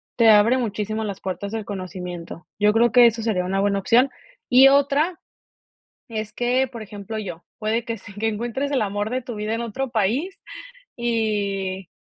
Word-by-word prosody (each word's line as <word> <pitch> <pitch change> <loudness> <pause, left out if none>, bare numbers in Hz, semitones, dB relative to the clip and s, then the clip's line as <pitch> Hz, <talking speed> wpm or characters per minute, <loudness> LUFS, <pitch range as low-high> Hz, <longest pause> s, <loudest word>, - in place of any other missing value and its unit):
te 230 -2 +5
abre 220 +4 +6
muchísimo 215 -2 -2
las 200 -3 -4
puertas 195 +2 -4
del 220 -2 -4
conocimiento. 180 -4 -7
Yo 210 0 +5
creo 235 +1 +3
que 245 -1 +8
eso 225 0 -1
sería 210 -5 0
una 190 +2 -1
buena 200 0 +1
opción. 240 +7 +4 0.4
Y 260 +2 +8
otra 285 +5 +2 0.9
es 215 -2 -5
que, 245 +3 +1
por 235 -2 -9
ejemplo, 210 +1 -6
yo, 180 -5 -7 0.2
puede 220 +2 -1
que 230 -2 -4
se 205 - -12
que 220 +2 -1
encuentres 240 +6 -2
el 275 - +1
amor 205 +1 -2
de 255 +1 -1
tu 240 -2 -7
vida 210 +1 -2
en 230 - -2
otro 240 +4 -3
país 250 - -1 0.6
y 200 -5 -1
220 Hz, 180 wpm, -23 LUFS, 200-240 Hz, 0.9 s, que